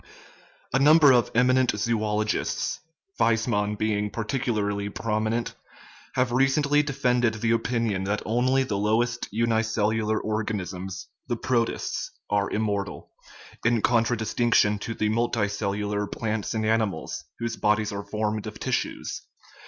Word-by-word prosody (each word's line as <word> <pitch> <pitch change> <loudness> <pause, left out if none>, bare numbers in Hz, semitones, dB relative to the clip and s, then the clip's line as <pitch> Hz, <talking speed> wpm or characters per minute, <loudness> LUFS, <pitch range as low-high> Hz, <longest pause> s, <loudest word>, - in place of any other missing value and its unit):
A 135 - +3
number 150 0 +7
of 120 -2 +3
eminent 130 +1 +4
zoologists 105 0 -1 0.4
Weismann 110 -2 +1
being 105 -1 0
particularly 105 -3 -2
prominent 110 +2 -1 0.6
have 125 -2 +1
recently 140 +3 +3
defended 125 -5 +1
the 115 +1 0
opinion 115 -4 0
that 105 +2 -1
only 130 +4 +2
the 105 -6 -2
lowest 115 +3 +1
unicellular 110 -1 +1
organisms, 95 -4 -3 0.2
the 120 - 0
protists, 115 -1 -1 0.2
are 100 -1 +1
immortal, 100 -2 -2 0.5
in 120 -2 +2
contradistinction 115 -2 +2
to 115 +2 -5
the 105 0 0
multicellular 105 -2 -1
plants 110 0 -2
and 110 0 0
animals, 110 -2 -1
whose 115 0 -3
bodies 105 0 +1
are 100 0 -4
formed 105 0 -2
of - - -8
tissues. - - -2
110 Hz, 115 wpm, -26 LUFS, 105-120 Hz, 0.6 s, number